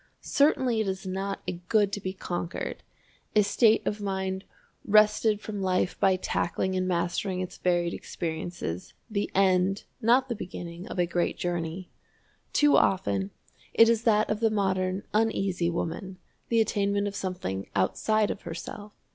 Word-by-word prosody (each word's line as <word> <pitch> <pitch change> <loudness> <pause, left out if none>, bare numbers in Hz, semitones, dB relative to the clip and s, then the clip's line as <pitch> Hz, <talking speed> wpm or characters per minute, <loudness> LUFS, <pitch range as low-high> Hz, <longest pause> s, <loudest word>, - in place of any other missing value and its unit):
Certainly 260 -6 +2
it 215 - -2
is 190 0 -3
not 195 +1 -3
a 175 -1 -4
good 205 -3 +3
to 205 - -2
be 185 - -3
conquered 175 -2 -4 0.5
a 210 - +6
state 215 +2 +3
of 210 0 -2
mind 190 -1 -2 0.4
wrested 215 0 +4
from 205 -2 -5
life 185 -1 +1
by 190 -1 +4
tackling 185 0 -1
and 185 0 0
mastering 180 +2 -1
its 185 -1 -5
varied 175 -1 +1
experiences, 160 - -5 0.2
the 205 -1 -1
end, 190 0 +3 0.2
not 245 +3 +4
the 245 - -2
beginning, 175 -3 -7
of - - -7
a 175 - +3
great 175 0 -1
journey. 175 +1 -3 0.6
Too 295 0 +4
often 100 - +2 0.5
it 230 0 +7
is 230 -1 +3
that 215 -2 +4
of 210 - -1
the 225 -1 +3
modern 190 -2 0
Uneasy 195 -5 +1
Woman 175 +2 -4 0.3
the 230 -1 +4
attainment 200 -1 +1
of 200 - -4
something 180 - -4
outside 215 - +2
of - - -6
herself. 205 +5 -7
190 Hz, 155 wpm, -27 LUFS, 175-210 Hz, 0.6 s, it